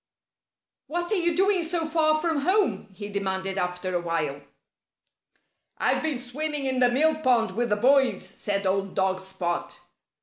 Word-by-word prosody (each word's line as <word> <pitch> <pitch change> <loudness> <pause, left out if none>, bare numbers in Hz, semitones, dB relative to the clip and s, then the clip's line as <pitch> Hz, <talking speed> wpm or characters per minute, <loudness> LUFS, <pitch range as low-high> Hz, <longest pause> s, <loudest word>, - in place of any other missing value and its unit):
"What 345 +2 -3
are - - +3
you 345 -3 +1
doing 385 0 +3
so 330 0 -1
far 310 -1 +2
from 325 -1 0
home?" 290 - +1
he 205 +2 -7
demanded 195 -1 -2
after 180 0 -3
a 175 - 0
while. 155 -5 -2 1.4
"I've - - +1
been 310 -4 -1
swimming 280 +3 -3
in 260 -1 0
the 250 -1 +5
mill 310 +5 +2
pond 240 -7 +3
with 240 +1 0
the 210 - +3
boys," 265 +4 +3
said 200 -1 -3
old 195 0 0
dog 190 0 +1
Spot. 190 -2 -4
245 Hz, 160 wpm, -26 LUFS, 190-315 Hz, 1.4 s, the